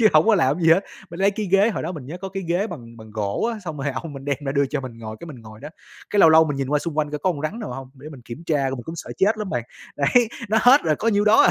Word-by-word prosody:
chứ 220 - +7
hổng 155 +4 +5
có 225 - +6
làm 145 -5 +2
cái 180 - -5
gì 165 - +6
hết. 175 - +4 0.3
Mình 170 +3 -8
lấy 195 - +4
cái 210 +1 -4
ghế, 195 +4 +4
hồi - - -4
đó 170 +3 -3
mình 145 -7 -8
nhớ 160 - -6
có 195 - -3
cái 195 0 -5
ghế 180 +5 +1
bằng 120 - -10
bằng 110 -1 -12
gỗ 105 - -1
á, 225 - -6
xong 160 -3 -5
rồi 140 +1 -1
ông 150 +4 -5
mình 135 -1 -9
đem 140 -1 0
ra 135 - -1
đưa 140 0 +2
cho 140 +1 -3
mình 125 -3 -8
ngồi 110 -1 -7
cái 170 - -8
mình 130 -8 -10
ngồi 110 0 -13
đó, 145 - -7 0.4
cái 205 - +3
lâu 165 - +8
lâu 160 0 +7
mình 145 -3 -3
nhìn 135 -1 -2
qua 150 +1 +2
xung 155 0 -5
quanh 150 -1 0
coi 150 - -3
có 185 +6 +1
con 145 - -7
rắn 155 +10 -3
nào 210 - -5
hông, 135 +1 -8
để 140 +3 -11
mình 140 -5 -11
kiểm 120 +9 -9
tra 145 -5 +1
luôn, 135 - -3
mình 120 - -8
cũng 165 - -7
sợ - - -7
chết 210 +3 +3
lắm 210 -3 -4
bạn. 120 - -1 0.3
Đấy, 220 - +3 0.2
nó 220 - +3
hết 260 +4 +7
rồi, 155 -2 +2
có 230 - -1
nhiêu 205 -2 +2
đó 215 +1 +6
à. - - +5
155 Hz, 360 wpm, -22 LUFS, 135-195 Hz, 0.4 s, lâu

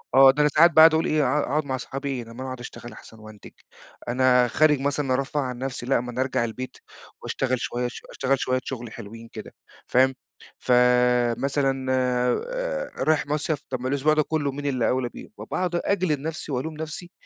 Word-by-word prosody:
آه، 135 0 +9
ده 145 +2 0
أنا 150 - +4
ساعات 170 +3 +7
باقعُد 160 +1 +8
اقول 160 +1 +2
إيه 155 -1 +2
ها 140 +3 +1
هاقعُد 150 +3 -1
مع 130 -2 -2
اصحابي 135 +2 -5
إيه 130 -3 -3
طب 115 - -14
ما - - -11
أنا - - -4
اقعُد 130 -1 -6
اشتغل 120 -1 -9
احسن 110 +1 -14
وانتج، 110 -1 -13 0.6
أنا 125 0 +4
خارج 150 0 +3
مثلًا 140 -1 0
أرفّه 135 +3 -1
عن 125 -2 -4
نفسي 130 -2 -4
لأ 135 -1 +2
ما 125 0 -6
أنا 125 +2 -2
ارجع 130 -3 0
البيت 125 +3 -7 0.5
واشتغل 130 -2 -1
شوية 125 0 -2
اش 120 - -6
اشتغل 135 0 0
شوية 130 +1 0
شغل 120 -4 -6
حلوين 115 +1 -10
كده - - -9 0.3
فاهم؟ 130 +1 +3 0.4
فمثلًا 125 +2 +2
آآ، - - -1
رايح 155 -1 +2
مَصيف 150 0 -1
طب 130 - -3
ما 130 - -2
الأسبوع 140 +3 +2
ده 155 - +2
كلّه 150 -2 -1
مين 145 +2 -7
اللي 130 -4 +1
أولى 125 -1 0
بيه - - -11
وباقعُد 180 -1 -3
أجلد 175 -5 0
نفسي 155 0 -5
والوم 140 +5 -3
نفسي 160 +3 -7
135 Hz, 200 wpm, -24 LUFS, 125-150 Hz, 0.6 s, آه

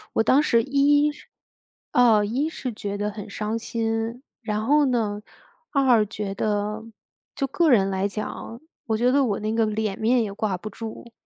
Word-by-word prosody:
我 225 - +3
当 270 +6 +4
时 235 -6 +3
一 290 +2 +3
是 - - -16 0.6
呃， 225 -4 +5
一 265 +9 -1
是 255 -7 -5
觉 205 -1 -4
得 210 0 -2
很 205 -1 -8
伤 215 +2 -3
心。 225 +2 -3 0.2
然 215 -1 -2
后 295 +2 +4
呢， 215 -5 0 0.5
二 255 -6 +4
觉 200 -1 -5
得， 210 +1 -2 0.5
就 275 - -1
个 325 +4 +2
人 195 -6 +4
来 190 +1 0
讲， 215 +3 -6 0.3
我 220 -1 +1
觉 245 +2 +3
得 280 0 +3
我 205 -5 0
那 215 +1 -2
个 225 -1 +2
脸 215 -2 -2
面 235 +2 +3
也 205 - -4
挂 200 -3 -2
不 215 +4 -7
住， 225 +2 -8
225 Hz, 190 characters per minute, -24 LUFS, 210-250 Hz, 0.6 s, 呃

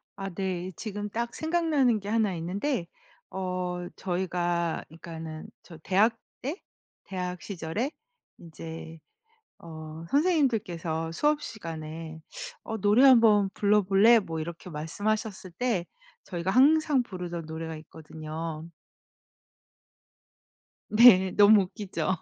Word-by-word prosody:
아 195 -1 -5
네. 185 0 -3
지금 210 0 -5
딱 235 +2 -3
생각나는 315 -8 +2
게 200 +1 -7
1 220 -3 +2
있는데. 180 - -2 0.5
어 180 -1 -3
저희가 175 -2 -1
그러니까는 160 -1 -8
저 165 - -12
대학 220 +4 +3 0.2
때 300 - -4 0.4
대학 180 -2 -4
시절에 195 - -3 0.5
인제 165 0 -9 0.6
어 160 -1 -9
선생님들께서 210 - +1
수업 295 - +1
시간에 160 -4 -7 0.4
어 220 - -4
"노래 210 +6 +4
한번 225 -6 +6
불러 210 0 +3
볼래?" 200 +5 +6
뭐 165 -5 -5
이렇게 170 +2 -7
말씀하셨을 195 +6 -3
때 235 -9 0 0.4
저희가 175 0 -3
항상 285 +3 +4
부르던 180 -6 -6
노래가 160 0 -5
있거든요. 155 0 -7 2.3
네. 205 -5 +7
너무 205 0 +7
웃기죠. 190 0 -3
185 Hz, 230 characters per minute, -28 LUFS, 165-220 Hz, 2.3 s, 네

